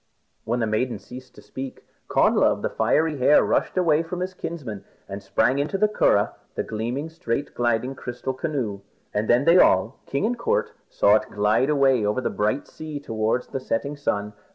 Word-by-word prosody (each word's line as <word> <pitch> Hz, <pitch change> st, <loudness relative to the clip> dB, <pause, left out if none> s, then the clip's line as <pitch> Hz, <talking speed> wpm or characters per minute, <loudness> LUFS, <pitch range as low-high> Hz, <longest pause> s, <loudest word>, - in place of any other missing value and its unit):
When 120 Hz, +2 st, -1 dB
the -, -, +2 dB
maiden 110 Hz, +3 st, -1 dB
ceased 130 Hz, +1 st, -12 dB
to -, -, -14 dB
speak, 130 Hz, 0 st, -8 dB, 0.2 s
Connla -, -, +3 dB
of -, -, +1 dB
the -, -, -1 dB
Fiery 155 Hz, -1 st, +1 dB
Hair 140 Hz, +4 st, +5 dB
rushed -, -, 0 dB
away 165 Hz, -4 st, +3 dB
from 165 Hz, +2 st, -5 dB
them 170 Hz, -, -5 dB, 0.2 s
and 100 Hz, +1 st, -6 dB
sprang 115 Hz, +7 st, +1 dB
into 150 Hz, +7 st, -1 dB
the 215 Hz, -, +3 dB
curragh, 105 Hz, -, +2 dB, 0.2 s
the -, -, -1 dB
gleaming, 120 Hz, +7 st, -3 dB
straight 145 Hz, -4 st, -3 dB
gliding 120 Hz, +2 st, 0 dB
crystal 125 Hz, 0 st, -5 dB
canoe. 130 Hz, -8 st, -3 dB, 0.3 s
And 105 Hz, +1 st, -1 dB
then 120 Hz, +4 st, +4 dB
they 170 Hz, +2 st, +6 dB
all, 100 Hz, -, +3 dB
king 140 Hz, +8 st, -1 dB
and 240 Hz, +2 st, -1 dB
court, 465 Hz, -, 0 dB, 0.2 s
saw -, -, +4 dB
it -, -, -6 dB
glide 105 Hz, +6 st, +2 dB
away 135 Hz, -5 st, +3 dB
over 105 Hz, +4 st, 0 dB
the 130 Hz, -, -2 dB
bright 105 Hz, +7 st, -1 dB
sea 155 Hz, -2 st, -7 dB
towards 115 Hz, -1 st, -1 dB
the 135 Hz, -, -3 dB
setting 130 Hz, +3 st, -2 dB
sun. 105 Hz, -7 st, -2 dB
130 Hz, 185 wpm, -24 LUFS, 110-155 Hz, 0.3 s, they